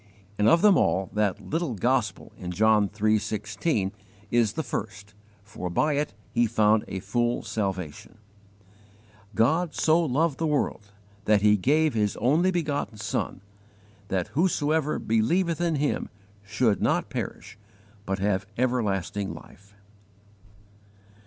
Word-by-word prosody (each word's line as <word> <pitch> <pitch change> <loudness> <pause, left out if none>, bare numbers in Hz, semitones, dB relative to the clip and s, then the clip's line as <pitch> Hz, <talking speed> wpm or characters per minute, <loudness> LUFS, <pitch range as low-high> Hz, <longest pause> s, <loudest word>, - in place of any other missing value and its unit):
And, 105 - +4
of 170 - +4
them 205 -3 +6
all, 95 0 +1
that 105 -3 0
'little 160 -6 -3
gospel' 110 -2 -1
in 90 - -6
John 105 +1 +3
iii. 110 +1 +3
16 105 - -2 0.4
is 115 -3 +2
the 160 - -2
first, 105 -5 -6 0.3
for 100 -4 -6
by 150 - +1
it 145 -6 -2 0.2
he 120 0 +2
found 110 -1 +3
a 95 - -4
full 120 +5 -1
salvation: 95 -4 -4 1.2
"GOD 160 +8 +2
SO 165 +2 +3
LOVED 150 +1 0
THE 165 - 0
WORLD 125 -8 -1 0.3
THAT 105 -1 +3
HE 105 0 +6
GAVE 150 +8 +2
HIS 105 -2 0
ONLY 155 - +3
BEGOTTEN 150 -10 -2
SON, 105 -3 -3 0.7
THAT 95 -4 -2
WHOSOEVER 155 -2 +1
BELIEVETH 165 +11 +1
IN 170 -2 +1
HIM 145 0 -1 0.4
SHOULD 105 +1 +1
NOT - - +1
PERISH, - - -6 0.5
BUT 95 0 -1
HAVE 95 -1 -1
EVERLASTING 105 -6 -1
LIFE." 100 +2 -15
110 Hz, 130 wpm, -26 LUFS, 100-150 Hz, 1.2 s, them